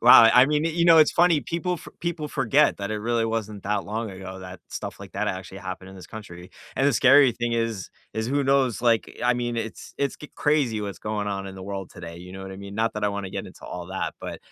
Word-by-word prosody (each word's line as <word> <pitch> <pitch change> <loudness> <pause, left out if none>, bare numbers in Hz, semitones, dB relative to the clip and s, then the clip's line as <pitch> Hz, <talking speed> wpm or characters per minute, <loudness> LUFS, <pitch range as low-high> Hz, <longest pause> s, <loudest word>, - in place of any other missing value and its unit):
Wow, 120 0 +10
I 120 +2 +8
I 135 - +5
mean, 150 +1 +1
you 165 +1 +1
know, 165 -1 +8
it's 155 - +7
funny, 170 -3 +4
people 170 +5 -2
fo - - -11
people 170 -3 -3
forget 135 +3 +3
that 100 +1 -3
it 110 - -1
really 115 +1 0
wasn't 110 -3 -3
that 105 +1 0
long 110 +1 -3
ago, 95 0 -8
that 90 -1 -9
stuff - - -6
like - - -10
that - - -1
actually 95 +1 -5
happened 95 0 -7
in 95 - -12
this 90 - -11
country, 90 -5 -10 0.3
and, 135 - +3
the 145 - +4
scary 135 +1 +6
thing 120 +1 -2
is 115 -5 -1 0.2
is 110 0 -1
who 140 0 +1
knows, 135 -4 +2
like, 115 -2 +1
I 125 0 +4
mean, 120 -1 -2
it's 115 -1 -5
it's 140 -1 0
get 150 - -12
crazy 140 -8 +2
what's 100 -2 -5
going 105 -1 -2
on 100 -1 -3
in 95 - -8
the 95 - -8
world 95 -1 -5
today, 85 -1 -9
you 90 +1 -10
know 95 0 -8
what 95 0 -7
I - - -8
mean, 100 0 -8
not 110 +1 0
that 105 - -2
I - - +3
want 100 0 -3
to - - -8
get - - -4
into - - -13
all 90 -1 -6
that, 95 0 -3
but, - - -6
110 Hz, 270 wpm, -25 LUFS, 95-135 Hz, 0.3 s, Wow